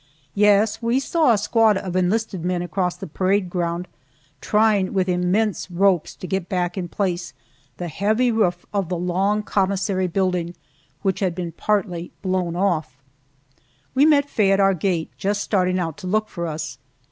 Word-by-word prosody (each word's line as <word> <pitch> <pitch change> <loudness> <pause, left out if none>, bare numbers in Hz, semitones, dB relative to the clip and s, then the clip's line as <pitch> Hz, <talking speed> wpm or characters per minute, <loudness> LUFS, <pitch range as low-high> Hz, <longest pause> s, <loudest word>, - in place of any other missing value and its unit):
Yes, 210 +2 +3
we 235 +3 +1
saw 310 0 +2
a 225 - +4
squad 215 0 +3
of 185 -2 -5
enlisted 190 0 0
men 180 0 -1
across 180 0 -1
the - - -7
parade 185 +3 0
ground, 175 0 -2 0.5
trying 210 -3 +2
with 190 -1 +2
immense 185 +4 0
ropes 180 -2 +1
to - - -8
get 190 -1 -3
back 180 -1 -1
in 185 -3 -3
place 175 -1 -2 0.4
the 175 - -4
heavy 215 +9 +1
roof 180 -6 0
of 195 -4 -1
the 180 - -1
long 190 +4 0
commissary 195 -1 0
building 180 -1 -1 0.5
which 190 -2 0
had 185 -4 0
been 175 -2 -4
partly 180 -2 -1
blown 185 -3 -1
off. 170 -8 0 1.0
We 275 +4 +5
met 285 -2 +4
Faye 210 -8 +2
at 195 - +3
our 195 0 +4
gate, 175 -2 -1
just 205 +1 0
starting 185 -2 +1
out 165 -4 -3
to 185 - -7
look 215 +3 0
for 170 -1 -4
us. 155 0 -5
190 Hz, 170 wpm, -22 LUFS, 175-205 Hz, 1.0 s, We